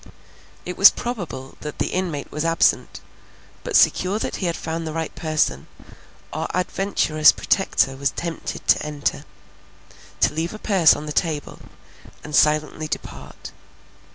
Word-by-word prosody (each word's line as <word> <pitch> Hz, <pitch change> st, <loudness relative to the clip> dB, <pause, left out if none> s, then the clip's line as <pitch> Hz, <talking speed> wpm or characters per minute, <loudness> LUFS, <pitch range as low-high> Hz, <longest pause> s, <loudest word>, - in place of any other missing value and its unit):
It 180 Hz, -, -5 dB
was 195 Hz, -, +11 dB
probable 175 Hz, -, -6 dB
that 150 Hz, -1 st, -7 dB
the -, -, -1 dB
inmate 175 Hz, -6 st, -3 dB
was 150 Hz, -, -3 dB
absent, 165 Hz, 0 st, +1 dB, 0.6 s
but -, -, -3 dB
secure 185 Hz, +3 st, +4 dB
that -, -, -3 dB
he 185 Hz, -, -2 dB
had 170 Hz, -, -2 dB
found 165 Hz, 0 st, -4 dB
the 155 Hz, -, -5 dB
right 165 Hz, 0 st, -3 dB
person, 155 Hz, -, -1 dB, 0.7 s
our -, -, -3 dB
adventurous 180 Hz, -4 st, +3 dB
Protector 135 Hz, -8 st, +1 dB
was 140 Hz, +1 st, 0 dB
tempted 170 Hz, -1 st, -6 dB
to -, -, +4 dB
enter, 150 Hz, -1 st, -3 dB, 1.0 s
to -, -, +3 dB
leave 165 Hz, +6 st, -3 dB
a -, -, -7 dB
purse 190 Hz, -7 st, +4 dB
on 150 Hz, -, -7 dB
the 150 Hz, -, -5 dB
table, 155 Hz, -2 st, -2 dB, 0.6 s
and 150 Hz, 0 st, -5 dB
silently 155 Hz, +1 st, +2 dB
depart. -, -, -7 dB
160 Hz, 145 wpm, -22 LUFS, 150-180 Hz, 1.0 s, was